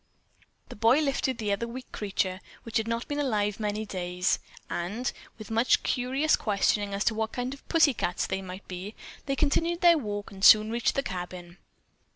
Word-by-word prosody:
The -, -, -9 dB
boy 225 Hz, +4 st, +4 dB
had 310 Hz, -, +2 dB
lifted 270 Hz, -2 st, 0 dB
the 215 Hz, -3 st, -2 dB
other 200 Hz, +4 st, -1 dB
weak 255 Hz, +2 st, -9 dB
creature, 190 Hz, -2 st, -2 dB, 0.2 s
which 230 Hz, 0 st, -2 dB
had 220 Hz, 0 st, -1 dB
not 230 Hz, +1 st, -2 dB
been 290 Hz, 0 st, -2 dB
alive 210 Hz, -7 st, 0 dB
many 210 Hz, 0 st, -2 dB
days, 180 Hz, -2 st, -1 dB, 0.3 s
and, 205 Hz, +9 st, -3 dB, 0.3 s
with 215 Hz, -1 st, -10 dB
much 230 Hz, +3 st, +3 dB
curious 265 Hz, +5 st, +1 dB
questioning 205 Hz, -1 st, 0 dB
as 200 Hz, -, 0 dB
to 225 Hz, -, +2 dB
what 220 Hz, 0 st, -2 dB
kind 250 Hz, +1 st, -3 dB
of 280 Hz, -, -15 dB
"pussy 320 Hz, -4 st, +5 dB
cats" 180 Hz, -5 st, -1 dB
they 190 Hz, 0 st, -2 dB
might 185 Hz, +1 st, -9 dB
be, 185 Hz, +4 st, -7 dB, 0.3 s
they 275 Hz, -, 0 dB
continued 330 Hz, +4 st, +1 dB
their 340 Hz, -2 st, +6 dB
walk 205 Hz, -4 st, -5 dB
and 195 Hz, -1 st, -10 dB
soon 215 Hz, +1 st, +8 dB
reached 235 Hz, 0 st, 0 dB
the 275 Hz, -, +1 dB
cabin. 180 Hz, -2 st, -7 dB
220 Hz, 190 wpm, -28 LUFS, 195-255 Hz, 0.3 s, soon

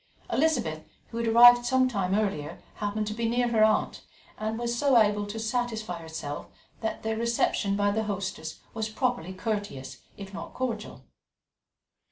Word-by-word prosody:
Elizabeth, 245 Hz, -, +1 dB, 0.3 s
who 230 Hz, -, -7 dB
had 235 Hz, -, -1 dB
arrived 245 Hz, +2 st, +8 dB
some 255 Hz, +1 st, +3 dB
time 195 Hz, -6 st, 0 dB
earlier, 195 Hz, -9 st, -2 dB, 0.2 s
happened 210 Hz, +1 st, -2 dB
to 210 Hz, -, -3 dB
be 230 Hz, +1 st, -1 dB
near 240 Hz, +1 st, +1 dB
her 220 Hz, -2 st, +4 dB
aunt, 215 Hz, 0 st, +2 dB, 0.4 s
and 220 Hz, +1 st, -2 dB
so 250 Hz, +4 st, +1 dB
was 235 Hz, -3 st, +8 dB
able 205 Hz, 0 st, -1 dB
to 215 Hz, +2 st, -5 dB
satisfy 220 Hz, -5 st, -2 dB
herself 160 Hz, -3 st, -6 dB, 0.3 s
that 220 Hz, -1 st, -3 dB
their 220 Hz, 0 st, -1 dB
reception 230 Hz, -3 st, +1 dB
by 205 Hz, 0 st, +2 dB
their 220 Hz, +1 st, -1 dB
hostess 190 Hz, -6 st, -4 dB
was 220 Hz, -1 st, -2 dB
properly 240 Hz, -6 st, -1 dB
courteous, 195 Hz, -, -4 dB, 0.2 s
if 200 Hz, -1 st, -9 dB
not -, -, -8 dB
cordial. 230 Hz, -5 st, -4 dB
220 Hz, 160 wpm, -28 LUFS, 200-235 Hz, 0.4 s, arrived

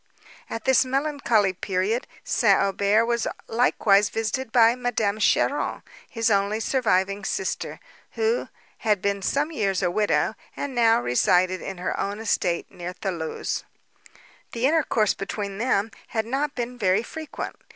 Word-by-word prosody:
At 225 Hz, -, -5 dB
this 265 Hz, 0 st, +5 dB
melancholy 265 Hz, -7 st, +1 dB
period 195 Hz, +6 st, -1 dB, 0.2 s
St. 205 Hz, -6 st, +3 dB
Aubert 200 Hz, +3 st, +2 dB
was 235 Hz, -1 st, 0 dB, 0.2 s
likewise 210 Hz, -3 st, +3 dB
visited 225 Hz, +2 st, -2 dB
by 230 Hz, -1 st, +6 dB
Madame 225 Hz, -4 st, -1 dB
Cheron, -, -, +1 dB, 0.3 s
his 230 Hz, -1 st, 0 dB
only 200 Hz, +2 st, +1 dB
surviving 200 Hz, -5 st, +1 dB
sister, 190 Hz, -1 st, -3 dB, 0.3 s
who 450 Hz, +2 st, 0 dB, 0.3 s
had 210 Hz, -2 st, +1 dB
been 200 Hz, +1 st, -1 dB
some 285 Hz, +9 st, 0 dB
years 195 Hz, -, 0 dB
a 175 Hz, -, +2 dB
widow, 210 Hz, +3 st, +1 dB, 0.2 s
and 285 Hz, -2 st, -4 dB
now 230 Hz, -2 st, +4 dB
resided 180 Hz, +10 st, +2 dB
on 195 Hz, -, -6 dB
her 180 Hz, -, -3 dB
own 200 Hz, +1 st, -2 dB
estate 190 Hz, -5 st, -1 dB
near 175 Hz, +1 st, -6 dB
Thoulouse. 170 Hz, -5 st, -3 dB, 0.9 s
The 235 Hz, +2 st, 0 dB
intercourse 275 Hz, -8 st, +2 dB
between 200 Hz, 0 st, -5 dB
them 225 Hz, -3 st, +1 dB, 0.2 s
had 220 Hz, -1 st, -2 dB
not 275 Hz, +5 st, -2 dB
been 245 Hz, 0 st, -4 dB
very 195 Hz, +1 st, +2 dB
frequent. 315 Hz, +5 st, -6 dB
215 Hz, 140 wpm, -24 LUFS, 195-245 Hz, 0.9 s, by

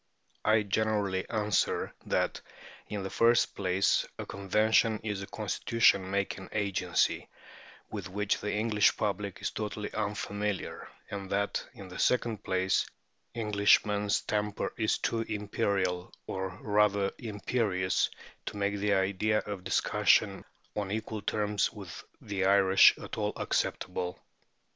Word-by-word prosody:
I 110 Hz, 0 st, +4 dB
generally 100 Hz, -2 st, 0 dB
answer 105 Hz, -3 st, 0 dB
that, -, -, 0 dB, 0.5 s
in 105 Hz, -2 st, -4 dB
the 95 Hz, -, -5 dB
first 120 Hz, +1 st, +3 dB
place, 95 Hz, 0 st, +2 dB
a -, -, -5 dB
convention 110 Hz, +3 st, +2 dB
is 105 Hz, -3 st, -3 dB
a 100 Hz, -, -6 dB
constitution 105 Hz, -1 st, +2 dB
making 100 Hz, -1 st, -2 dB
agency 100 Hz, -4 st, 0 dB, 0.6 s
with 100 Hz, -3 st, -5 dB
which 105 Hz, +2 st, 0 dB
the 105 Hz, -, -2 dB
English 105 Hz, -1 st, +2 dB
public 100 Hz, -2 st, -2 dB
is -, -, -1 dB
totally 105 Hz, -1 st, -4 dB
unfamiliar, 105 Hz, -1 st, -3 dB, 0.2 s
and 100 Hz, -1 st, -5 dB
that, 100 Hz, +1 st, 0 dB
in 100 Hz, -5 st, -9 dB
the 90 Hz, -, -9 dB
second 120 Hz, -4 st, +1 dB
place, 95 Hz, 0 st, +1 dB, 0.5 s
Englishmen's 105 Hz, -1 st, +3 dB
temper 105 Hz, -1 st, -2 dB
is 110 Hz, -1 st, +1 dB
too 115 Hz, -, -1 dB
imperial, 100 Hz, -4 st, -1 dB
or 95 Hz, 0 st, -3 dB
rather 105 Hz, -2 st, +2 dB
imperious, 105 Hz, -4 st, 0 dB, 0.4 s
to -, -, -4 dB
make 100 Hz, 0 st, 0 dB
the 100 Hz, 0 st, +2 dB
idea 100 Hz, +3 st, +1 dB
of 100 Hz, -3 st, -5 dB
discussion 95 Hz, -, +2 dB, 0.3 s
on 105 Hz, -2 st, -2 dB
equal 110 Hz, 0 st, -3 dB
terms 105 Hz, 0 st, 0 dB
with 100 Hz, -6 st, -9 dB, 0.2 s
the 100 Hz, -2 st, -3 dB
Irish 95 Hz, -1 st, +6 dB
at -, -, -7 dB
all -, -, 0 dB
acceptable. 90 Hz, -1 st, -2 dB
100 Hz, 125 wpm, -30 LUFS, 95-105 Hz, 0.6 s, Irish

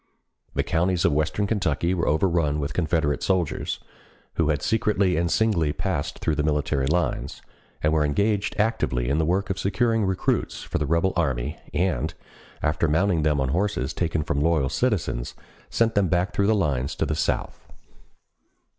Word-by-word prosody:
The -, -, +1 dB
counties 85 Hz, +1 st, +1 dB
of 80 Hz, -, +3 dB
western 75 Hz, +7 st, 0 dB
Kentucky 90 Hz, -5 st, 0 dB
were 85 Hz, -3 st, -1 dB
overrun 80 Hz, -2 st, +1 dB
with 70 Hz, 0 st, -3 dB
Confederate 80 Hz, -3 st, 0 dB
soldiers, 90 Hz, -5 st, -1 dB, 0.5 s
who 80 Hz, -2 st, +1 dB
had 75 Hz, -2 st, 0 dB
secretly 100 Hz, -4 st, +2 dB
and 85 Hz, +1 st, +1 dB
singly 90 Hz, -8 st, +2 dB
passed 85 Hz, -2 st, -2 dB
through 80 Hz, -, -1 dB
the 75 Hz, -, 0 dB
military 75 Hz, -2 st, 0 dB
lines, 85 Hz, +3 st, -1 dB, 0.4 s
and 75 Hz, +1 st, +3 dB
were 80 Hz, -1 st, +3 dB
engaged 100 Hz, +7 st, 0 dB
actively 65 Hz, -, 0 dB
in 70 Hz, +3 st, +1 dB
the 80 Hz, -, +2 dB
work 95 Hz, +3 st, 0 dB
of 95 Hz, -, -3 dB
securing 110 Hz, +3 st, +1 dB
recruits 95 Hz, -2 st, -1 dB
for -, -, -3 dB
the 75 Hz, -, -1 dB
rebel 85 Hz, +5 st, +2 dB
army, 70 Hz, -4 st, -1 dB
and, 90 Hz, +1 st, -1 dB, 0.5 s
after 75 Hz, +2 st, +1 dB
mounting 85 Hz, +2 st, +2 dB
them 75 Hz, -1 st, +2 dB
on 65 Hz, -1 st, 0 dB
horses 85 Hz, -4 st, -1 dB
taken 80 Hz, -3 st, -1 dB
from 70 Hz, -2 st, -1 dB
loyal 80 Hz, -4 st, +2 dB
citizens, 90 Hz, -, -1 dB, 0.3 s
sent 115 Hz, -1 st, +1 dB
them 100 Hz, -3 st, +2 dB
back 90 Hz, +3 st, 0 dB
through 100 Hz, -, +1 dB
the 110 Hz, -, +4 dB
lines 70 Hz, -9 st, 0 dB
to -, -, 0 dB
the -, -, -1 dB
South. -, -, -2 dB
85 Hz, 170 wpm, -24 LUFS, 75-95 Hz, 0.5 s, the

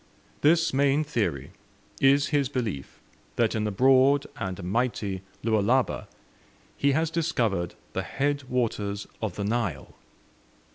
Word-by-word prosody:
This 165 Hz, +1 st, +4 dB
main 140 Hz, +2 st, +3 dB
theory 100 Hz, -, -2 dB, 0.5 s
is 140 Hz, +1 st, +4 dB
his 145 Hz, -4 st, +1 dB
belief 115 Hz, -, -4 dB, 0.4 s
that 115 Hz, -2 st, +2 dB
in 110 Hz, -1 st, -1 dB
the 105 Hz, -, -1 dB
broad 135 Hz, +5 st, +4 dB
and 95 Hz, -2 st, -4 dB
mighty 105 Hz, -1 st, -1 dB, 0.2 s
Lualaba 115 Hz, +3 st, +1 dB, 0.7 s
he 140 Hz, 0 st, +2 dB
has 160 Hz, +2 st, +1 dB
discovered 115 Hz, -, 0 dB, 0.2 s
the 95 Hz, -, -1 dB
head 140 Hz, +8 st, -1 dB
waters 105 Hz, -5 st, -1 dB, 0.2 s
of 110 Hz, -5 st, -3 dB
the 100 Hz, -, -3 dB
Nile. 105 Hz, -, -2 dB
120 Hz, 125 wpm, -26 LUFS, 100-140 Hz, 0.7 s, This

